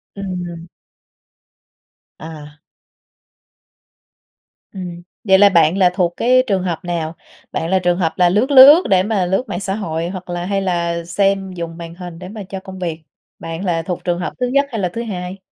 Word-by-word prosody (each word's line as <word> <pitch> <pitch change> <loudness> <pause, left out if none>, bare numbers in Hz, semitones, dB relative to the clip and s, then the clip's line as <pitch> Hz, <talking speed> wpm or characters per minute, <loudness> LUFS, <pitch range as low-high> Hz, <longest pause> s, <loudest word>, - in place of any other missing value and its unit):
Ừm. 175 -4 -6 1.5
À! 150 -2 -10 2.1
Ừm. 180 -3 -7 0.2
Vậy 190 -3 +5
là 205 0 +7
bạn 170 -1 +3
là 185 -2 +5
thuộc 180 -2 0
cái 255 +2 +4
trường 195 -3 0
hợp 175 -3 -2
nào? 165 -2 -3 0.4
Bạn 165 - -3
là 190 +1 +3
trường 175 -1 +1
hợp 165 -4 0
là 180 -1 +4
lướt 215 +10 +1
lướt 285 +6 +9
để 185 -1 +4
mà 205 -3 0
lướt 190 +7 0
mạng 175 - -4
xã 195 0 -2
hội 165 -5 -3
hoặc 185 -1 -8
là 175 0 -3
hay 195 +1 -1
là 170 -2 -1
xem 195 +2 0
dùng 170 -2 -6
màn 170 0 -8
hình 175 -2 -9
để 180 0 -8
mà 210 0 -7
cho 195 - -5
công 190 -1 -10
việc? 165 -3 -4 0.4
Bạn 165 +4 -6
là 170 -3 0
thuộc 175 +1 -5
trường 175 -2 -1
hợp 180 - -4
thứ 250 - 0
nhất 280 +3 +2
hay 230 -5 -4
là 180 - 0
thứ 235 - -3
hai? 185 -4 -5
180 Hz, 190 wpm, -18 LUFS, 170-195 Hz, 2.1 s, lướt